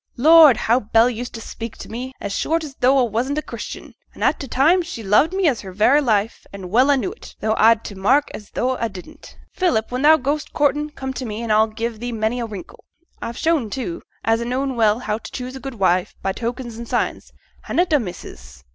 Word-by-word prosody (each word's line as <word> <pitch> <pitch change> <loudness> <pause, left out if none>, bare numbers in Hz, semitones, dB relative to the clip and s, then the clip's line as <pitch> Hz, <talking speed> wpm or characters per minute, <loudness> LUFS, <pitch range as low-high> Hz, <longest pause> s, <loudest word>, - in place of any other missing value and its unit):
Lord! 305 -1 +7
how 235 +3 +2
Bell 225 +2 +3
used 245 +1 -6
to 225 - -7
speak 230 0 -7
to - - -9
me, 250 +4 -6
as 200 -1 -4
short 325 0 0
as 295 -3 -8
though 260 +2 +4
a 255 - +4
wasn't 240 +6 -2
a 305 - -1
Christian, - - -8 0.2
an' - - -6
a' - - +4
t' 275 - -8
time 310 +9 +3
she 330 -10 -7
loved 215 - +3
me 380 -2 +1
as 255 -7 +1
her 190 - -9
very 220 +10 +4
life, 220 -4 0
an' 190 -2 -9
well 255 +6 +4
a 285 - +4
knew 365 - -2
it, 440 - -13
tho' 220 0 0
a'd 225 0 +5
to - - -7
mak' 260 +10 +2
as 210 - -9
tho' 255 +1 -1
a 230 - -2
didn't. 185 -3 -12 0.2
Philip, 245 - 0
when 250 +1 -2
thou 310 +2 +7
goes 290 +2 -2
courtin', 295 +1 0
come 265 -3 -6
t' 260 - -5
me, 225 -1 -5
and 230 - -2
a'll 215 +1 +4
give 225 +1 -5
thee 245 +1 -4
many 225 +2 -1
a 235 - -3
wrinkle. 200 -5 -10 0.4
A've 235 - -5
shown, 320 -9 +1
too, 200 -7 -4 0.2
as 225 +1 +1
a - - -3
know 255 +3 -1
well 225 -5 +2
how 220 -3 -3
t' - - -10
choose 255 0 -6
a - - -7
good 270 -2 -7
wife 185 -1 +1
by 195 - 0
tokens 235 +2 -5
an' 235 - -7
signs, - - -2 0.3
hannot 350 -2 +1
a, 295 - +5
missus? 70 - -9
240 Hz, 240 wpm, -21 LUFS, 215-275 Hz, 0.4 s, Lord